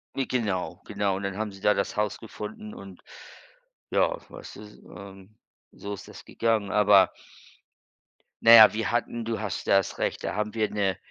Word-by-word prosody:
Ne, 135 Hz, -, -1 dB
genau 95 Hz, -7 st, -2 dB
genau. 100 Hz, -1 st, -1 dB
Und 100 Hz, -, -7 dB
dann 100 Hz, 0 st, -4 dB
haben 110 Hz, -1 st, -3 dB
sie 95 Hz, 0 st, -14 dB
da 105 Hz, -, +4 dB
das 100 Hz, -, -3 dB
haus 105 Hz, -1 st, -1 dB
gefunden 105 Hz, -1 st, -9 dB
und, 95 Hz, -2 st, -12 dB, 0.9 s
ja, -, -, +1 dB
weiß -, -, -11 dB
du? -, -, -11 dB
S 105 Hz, 0 st, -14 dB, 0.2 s
ähm, 95 Hz, +2 st, -13 dB, 0.3 s
so 100 Hz, 0 st, -7 dB
ist 100 Hz, -, -10 dB
das -, -, -12 dB
gegangen. 110 Hz, -3 st, -1 dB
Aber 105 Hz, -2 st, +5 dB, 1.3 s
na 115 Hz, -, +8 dB
ja, 110 Hz, -2 st, +10 dB
wir 110 Hz, 0 st, -2 dB
hatten 120 Hz, -1 st, -2 dB
du 115 Hz, 0 st, -3 dB
hast 105 Hz, -4 st, -5 dB
das 95 Hz, -1 st, +1 dB
Recht -, -, -2 dB
da -, -, -3 dB
haben 105 Hz, 0 st, -2 dB
wir 110 Hz, -2 st, 0 dB
'ne 100 Hz, -3 st, -1 dB
105 Hz, 185 wpm, -26 LUFS, 100-110 Hz, 1.3 s, ja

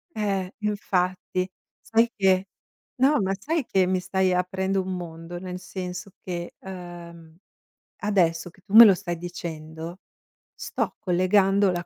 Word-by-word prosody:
Ehm, 195 Hz, -3 st, -1 dB
infatti 185 Hz, -3 st, -1 dB, 0.3 s
sai 230 Hz, +1 st, +2 dB
che 190 Hz, -1 st, +3 dB, 0.5 s
no, 270 Hz, 0 st, +3 dB
ma 190 Hz, 0 st, 0 dB
sai 305 Hz, +2 st, -1 dB
che 190 Hz, -1 st, +2 dB
mi 185 Hz, 0 st, +1 dB
stai 190 Hz, 0 st, +1 dB
aprendo 190 Hz, +2 st, 0 dB
un 185 Hz, 0 st, -4 dB
mondo, 170 Hz, 0 st, -7 dB
nel 180 Hz, 0 st, -6 dB
senso 180 Hz, 0 st, -6 dB
che, 175 Hz, -1 st, -5 dB
ehm, 170 Hz, -3 st, -10 dB, 0.6 s
adesso 175 Hz, -5 st, +1 dB
che 190 Hz, -, -22 dB
tu 200 Hz, -, -10 dB
me 230 Hz, +1 st, +13 dB
lo 200 Hz, -, +8 dB
stai 175 Hz, -2 st, -4 dB
dicendo, 165 Hz, 0 st, -7 dB, 0.5 s
sto -, -, -3 dB
collegando 195 Hz, +1 st, +3 dB
la 175 Hz, 0 st, -3 dB
185 Hz, 135 wpm, -25 LUFS, 175-195 Hz, 0.6 s, me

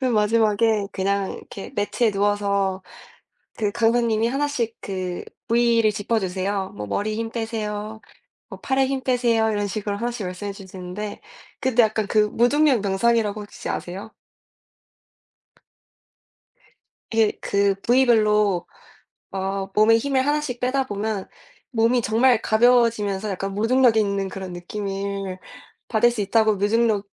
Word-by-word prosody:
맨 255 Hz, -2 st, +1 dB
마지막에 215 Hz, -1 st, +2 dB
그냥 195 Hz, 0 st, -1 dB
이렇게 195 Hz, -, -9 dB
매트에 215 Hz, +2 st, +1 dB
누워서 200 Hz, -1 st, 0 dB, 0.8 s
그 210 Hz, -2 st, 0 dB
강사님이 230 Hz, -1 st, +2 dB
하나씩 270 Hz, -4 st, -1 dB
그 185 Hz, -2 st, -4 dB, 0.3 s
부위를 230 Hz, -2 st, +3 dB
짚어 215 Hz, +2 st, -1 dB
주세요. 190 Hz, +1 st, -2 dB
뭐 105 Hz, 0 st, -6 dB
"머리에 210 Hz, -, -2 dB
힘 225 Hz, +1 st, -3 dB
빼세요. 220 Hz, -2 st, -4 dB, 0.5 s
뭐 -, -, -10 dB
팔에 265 Hz, 0 st, +1 dB
힘 270 Hz, 0 st, -2 dB
빼세요." 235 Hz, -3 st, +2 dB
이런 205 Hz, -1 st, -1 dB
식으로 200 Hz, 0 st, -3 dB
하나씩 235 Hz, -2 st, -3 dB
말씀해 190 Hz, +3 st, -5 dB
주시는데 190 Hz, +1 st, -7 dB, 0.4 s
근데 245 Hz, -2 st, +3 dB
약간 215 Hz, -1 st, 0 dB
그 215 Hz, -, +2 dB
무중력 265 Hz, +4 st, +3 dB
명상이라고 210 Hz, +1 st, +1 dB
혹시 205 Hz, -, -9 dB
아세요? 195 Hz, +5 st, -5 dB, 3.0 s
이게 225 Hz, -2 st, +3 dB
그 200 Hz, 0 st, +1 dB
부위별로 215 Hz, -6 st, +3 dB, 0.6 s
어 195 Hz, 0 st, -3 dB
몸에 215 Hz, +2 st, +5 dB
힘을 265 Hz, +1 st, 0 dB
하나씩 290 Hz, -4 st, -1 dB
빼다 260 Hz, +1 st, 0 dB
보면 205 Hz, -2 st, -3 dB, 0.4 s
몸이 240 Hz, 0 st, +2 dB
정말 230 Hz, +2 st, +3 dB
가벼워지면서 220 Hz, -3 st, +2 dB
약간 195 Hz, +1 st, -3 dB
무중력 230 Hz, +3 st, +3 dB
있는 200 Hz, -2 st, +1 dB
그런 190 Hz, -2 st, -7 dB
느낌을 195 Hz, +1 st, -4 dB, 0.5 s
받을 240 Hz, +1 st, +3 dB
수 235 Hz, -2 st, -4 dB
있다고 215 Hz, +2 st, +3 dB
무중력 210 Hz, 0 st, +1 dB
215 Hz, 290 characters per minute, -23 LUFS, 200-235 Hz, 3.0 s, 몸에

